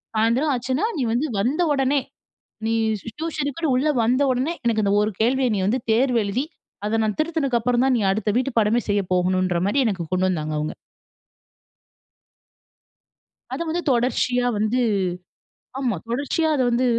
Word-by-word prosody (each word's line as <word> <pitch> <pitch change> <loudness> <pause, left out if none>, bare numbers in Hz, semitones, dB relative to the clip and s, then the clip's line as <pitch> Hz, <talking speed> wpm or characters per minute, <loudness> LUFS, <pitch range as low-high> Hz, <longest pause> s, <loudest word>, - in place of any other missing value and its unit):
"சாயந்திரம் 235 +7 +2
ஆச்சுனா, 260 - -1
நீ - - -1
வந்து 260 +7 0
வந்த 265 - 0
உடனே, 275 +1 +2 0.7
நீ 225 - +1 0.5
டியூஷனுக்குன்னு 310 -2 -2
உள்ள 290 +4 +1
வந்த 250 +5 +2
உடனே, 260 +7 -1
எனக்கு 220 -2 +1
இந்த 200 - +2
ஒரு 210 - 0
கேள்விய 255 +3 +2
நீ - - -1
வந்து 245 +5 +1
தேர்வு 245 0 +3
எழுதி, 225 +8 -1 0.4
அத 225 +1 0
நான் 210 -1 -1
திருத்தினக்கு 310 -7 0
அப்புறம் 245 +2 +1
தான், 260 - +3
நீ - - -1
அடுத்த 215 +1 -1
வீட்டு 260 0 -1
பாடமே 220 +2 +2
செய்ய 205 -1 +2
போகணும்ன்றமாரி" 185 +5 +1
எனக்கு 190 -6 -1
கொண்டு 185 +1 +2
வந்தாங்க, 155 -3 -2
அவுங்க. 150 +1 -3 2.8
அத - - -4
வந்து 345 +2 -1
தொடர்ச்சியா 245 0 +1
வந்து, 220 +4 +1 1.0
ஆமா 245 -7 0
தொடர்ச்சியா 285 +6 0
அத 260 - +1
வந்து 245 +2 +1
245 Hz, 150 wpm, -23 LUFS, 210-270 Hz, 2.8 s, தேர்வு